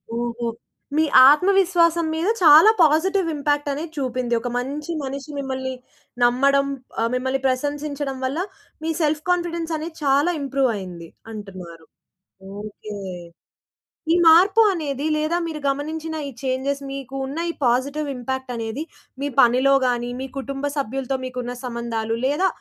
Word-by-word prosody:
ఓహో! 235 0 -3 0.5
మీ 315 - +4 0.2
ఆత్మవిశ్వాసం 345 0 +3
మీద 335 +4 -1
చాలా 315 +6 +9
పాజిటివ్ 335 +4 +3
ఇంపాక్ట్ 290 0 0
అనేది 310 +4 -4
చూపింది. 250 -2 -2
ఒక 245 - -3
మంచి 285 +6 -4
మనిషి 275 +2 -6
మిమ్మల్ని 260 -1 -3 0.5
నమ్మడం 275 +3 +3 0.3
ఆహ్, 230 - +1
మిమ్మల్ని 260 +1 -1
ప్రశంసించడం 285 +1 -2
వల్ల, 275 +6 -2 0.4
మీ 325 - -1
సెల్ఫ్ 300 0 +1
కాన్ఫిడెన్స్ 340 -2 -1
అనేది 320 +1 -6
చాలా 285 +5 +3
ఇంప్రూవ్ 275 -2 +1
అయ్యింది 175 -4 -7 0.2
అంటున్నారు. 185 -6 -9 0.8
ఓకే. 210 0 -8 1.2
ఈ - - +4
మార్పు 370 +7 +7
అనేది 290 -4 -3
లేదా 310 +3 0
మీరు 315 -2 -5
గమనించిన 315 +3 -3
ఈ - - -5
చేంజెస్ 270 +2 -1
మీకు 270 -1 -7
ఉన్న 285 +5 -5
ఈ - - -13
పాజిటివ్ 280 +5 +1
ఇంపాక్ట్ 260 +1 -4
అనేది 230 +6 -4 0.4
మీ 285 - 0
పనిలో 255 +3 +5
గాని, 240 0 -1
మీ 265 - -4
కుటుంబ 275 +1 -5
సభ్యులతో 270 0 -2
మీకున్న 250 -1 -5
సంబంధాలు, 235 -2 -3
లేదా 295 +8 +2
275 Hz, 135 wpm, -22 LUFS, 250-310 Hz, 1.2 s, చాలా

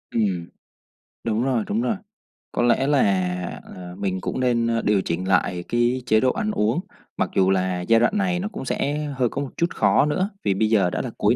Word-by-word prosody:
Ừm, 95 -7 0 0.8
đúng 115 0 0
rồi, 125 -4 +1
đúng 215 +3 0
rồi. 225 - 0 0.6
Có - - -1
lẽ 120 +3 +3
là, 145 -2 +3 0.8
à, 90 -1 -8
mình 95 -2 -2
cũng - - -3
nên, 120 -2 +2
a, 115 0 +1
điều 105 -2 +2
chỉnh 90 +1 -3
lại 90 -1 +1
cái 120 +2 +1
chế 110 -3 +4
độ 130 +2 +3
ăn 215 +9 -2
uống, 110 - +1 0.4
mặc - - 0
dù 95 0 +4
là 95 -1 +1
giai 115 +5 +4
đoạn 120 - +2
này 180 -3 +1
nó 190 - -2
cũng 210 - -7
sẽ 145 +2 -1 0.2
hơi 125 -2 +2
có 140 - -3
một 140 - -4
chút 170 - +1
khó - - +4
nữa, 185 +6 0
vì 100 - +2
bây 110 +3 +1
giờ 100 -5 +3
đã - - -2
là - - -4
cuối - - +3
115 Hz, 220 wpm, -23 LUFS, 95-135 Hz, 0.8 s, chế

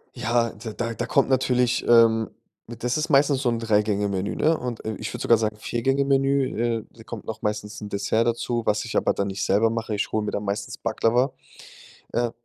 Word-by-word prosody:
Ja, 115 0 +1
d 110 +1 -8
da 115 -1 -2
da 120 - -3
kommt 140 +3 +2
natürlich, 125 -2 +2
ähm, 115 -2 +5 0.4
äh 120 - -6
das 125 +4 -1
ist 155 +2 -1
meistens 140 -1 +4
so 130 - +1
'n 115 - 0
Drei-Gänge-Menü, 105 -3 0
ne? 160 +2 +3
Und, 120 -4 -5
äh 110 - -2
ich 110 - -5
würde - - -5
sogar 115 -2 +4
sagen, 105 -1 -1
Vier-Gänge-Menü, 135 -1 +1
äh, - - -18
da 115 - -15
kommt 115 -1 -8
noch 110 0 -6
meistens 105 0 -3
'n 105 - -6
Dessert 100 +3 0
dazu, 120 0 -1
was 105 0 +1
ich 115 - -6
aber - - +2
dann 100 - -1
nicht 100 0 -3
selber 105 +4 +3
mache. 115 -2 -3
Ich 100 - -2
hole 110 -1 0
mir - - -2
dann 100 - -3
meistens 100 0 -3
Baklava, 120 +4 +1 0.8
äh 120 0 0
115 Hz, 210 wpm, -24 LUFS, 105-120 Hz, 0.8 s, ähm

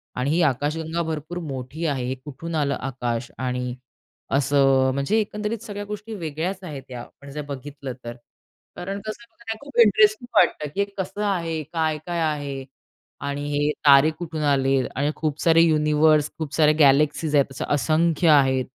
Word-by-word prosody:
आणि 125 +3 -1
ही 170 +3 +2
आकाशगंगा 155 +4 0
भरपूर 160 +2 -4
मोठी 135 +5 -5
आहे. 135 -5 -1
हे 130 +1 -2
कुठून 160 +3 -6
आलं 140 -2 +1
आकाश 120 -3 -4
आणि 125 0 -3 0.6
असं 135 -1 +3
अ, - - +1
म्हणजे 140 +12 +1
एकंदरीत 210 +1 -2
सगळ्या 205 -2 -6
गोष्टी 210 +2 -7
वेगळ्याच 175 +3 -4
आहेत 145 -6 -7
या 125 -1 -6
आपण 140 +3 -14
जर 150 - -5
बघितलं 140 -1 -7
तर. 120 0 -6 0.6
कारण 195 +3 -5
कसं 215 +2 -6
बघा 225 -1 -6
खूप 285 -3 -11
इंटरेस्टिंग 215 +1 +5
वाटतं, 150 - +3
की - - -3
हे 200 - +3
कसं 190 +2 -4
आहे? 165 -5 -1
काय-काय 160 +1 -1
आहे? 145 -4 -2 0.6
आणि 140 0 -3
हे 145 +1 +1 0.2
तारे 140 +2 +7
कुठून 160 -2 -4
आले? 135 -1 +3 0.2
आणि 145 +3 0
खूप 155 -1 -2
सारे 165 -1 +5
युनिव्हर्स, 155 -1 +3
खूप 155 -3 -5
साऱ्या 155 -1 +5
गॅलेक्सीज 145 +1 +4
आहेत. 140 -2 +5
असं 135 - -4
असंख्य 160 +3 +2
आहेत 135 -3 +4
150 Hz, 165 wpm, -23 LUFS, 140-170 Hz, 0.6 s, तारे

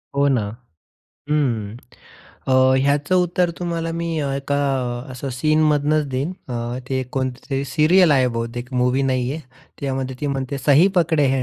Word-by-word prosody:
हो, 140 0 +3
ना. 130 -5 +2 0.9
हं. 120 -8 0 0.7
अ, - - +3 0.2
ह्याचं 140 +5 +1
उत्तर 175 0 +1
तुम्हाला 170 -2 -2
मी 170 0 -3 0.3
एका 140 +1 -2 0.5
असं 130 +2 -6
सीनमधनंच 155 +1 +2
देईन 140 +7 -1 0.2
अ, 120 0 -3
ते 130 -1 0
कोणते 130 -1 -2
तरी 135 0 -1
सीरियल 160 +6 +4
आहे 130 -2 +4
बहुतेक 115 +1 -5
मूव्ही 125 +2 +2
नाहीये. 130 +2 -1 0.4
त्यामध्ये 130 -2 -3
ती 150 - -2
म्हणते, 135 0 -2
"सही 145 +6 +5
पकडे 160 -4 +3
है." 130 - 0
140 Hz, 140 wpm, -21 LUFS, 130-155 Hz, 0.9 s, सही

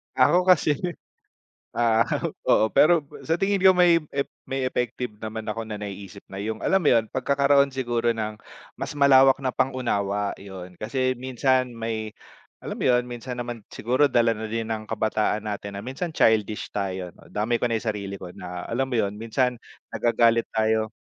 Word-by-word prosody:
Ako 175 +8 +4
kasi, 180 -4 +5 1.0
ah, 115 -1 +3 0.4
oo. 110 - +4
Pero 170 +1 +5 0.2
sa 160 - +2
tingin 200 0 +2
ko 190 - +9
may 175 -2 +5 0.2
ef 140 - -1 0.2
may 135 0 -2
effective 125 -1 -2
naman 110 0 -6
ako 115 +1 -4
na 105 -1 -6
naiisip 100 0 -8
na 95 - -7
yung, 110 +2 -4
alam 190 - +3
mo 165 -6 +1
yun, 115 -2 +2
pagkakaroon 140 +1 +3
siguro 120 -2 0
ng 110 -1 -4 0.4
mas - - -4
malawak 135 -2 +6
na 130 - 0
pang-unawa, 105 -7 -1
yun, 90 -2 -10
kasi 130 +3 -1
minsan 130 0 +1
may, 110 -1 -4 0.5
alam - - -5
mo - - -3
yun, 125 -1 +4
minsan 120 +1 -6
naman 120 -3 -6
siguro 130 +6 +2
dala 120 -4 +3
na 110 +1 -5
din 115 +1 -3
ng 110 -1 -3
kabataan 110 -1 0
natin 100 -1 -5
na 100 - -6
minsan 135 - -4
childish 110 -4 +2
tayo, 95 -3 -3 0.2
damay 110 +3 0
ko - - -2
na 115 -1 0
yung 115 - -4
sarili 100 -2 -5
ko 90 - -7
na, 90 0 -7
alam 125 +3 +1
mo 130 - -4
yun, 100 -1 -1
minsan 125 +3 0 0.3
nagagalit 115 -1 +3
tayo. 110 0 +1
115 Hz, 175 wpm, -25 LUFS, 110-130 Hz, 1.0 s, ko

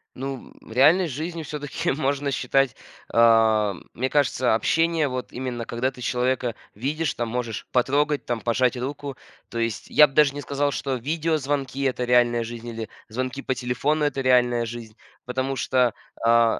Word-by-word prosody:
Ну, 135 0 -6
м, - - -15
реальной 155 +10 +5
жизнью 160 +4 -4
всё-таки 145 -2 -3
можно 140 0 -1
считать, 125 0 +1 0.4
а, 110 -3 +4 0.2
мне 130 +2 -1
кажется, 130 -4 +2
общение 165 +6 +2
вот 130 -1 -5
именно 120 -2 -4
когда 120 +3 -1
ты 130 -2 -13
человека 125 -1 0 0.2
видишь, 145 +8 -1
там 120 -1 -2
можешь 115 -2 -3
потрогать, 145 +4 +1
там 120 -1 -2
пожать 120 +2 +1
руку. 140 +1 -5 0.3
То 120 - -6
есть 115 -2 -2
я 150 - +7
б 135 - -17
даже 145 -1 +4
не 145 - -4
сказал, 145 +1 -1
что 135 -1 -2
видеозвонки- 145 -1 -1
это 125 -2 0
реальная 120 -1 +3
жизнь 120 +1 -7
или 115 -2 -5 0.2
звонки 130 +4 -3
по 130 - -2
телефону- 145 +5 0
это 140 -2 -1
реальная 125 -2 +3
жизнь, 115 -1 -8 0.3
потому 130 +2 -2
что, 125 -2 +2 0.3
а 115 0 +4
130 Hz, 165 wpm, -24 LUFS, 120-140 Hz, 0.4 s, я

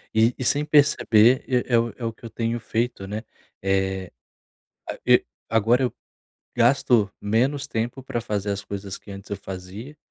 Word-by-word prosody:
e 115 +2 +4
e - - -4
sem 145 +4 +2
perceber 130 -5 +4
e 125 -1 +1
é 120 - +4
o 115 0 0
é 120 - -5
o 115 - -2
que - - -30
eu - - -6
tenho 115 +1 -2
feito, 115 -2 -2
né. 105 +3 -4 0.4
Eh, 95 -1 0 0.8
a - - -4
e - - +5 0.2
agora 115 +3 +3
eu 125 - 0 0.6
gasto 120 -3 +3
menos 130 +7 +1
tempo 120 +1 -3
pra 125 -2 -3
fazer 105 -2 -2
as 100 -1 -2
coisas 100 -1 -6
que - - -14
antes 100 +1 -9
eu 100 - -3
fazia 95 +8 -8
115 Hz, 180 wpm, -24 LUFS, 100-125 Hz, 0.8 s, e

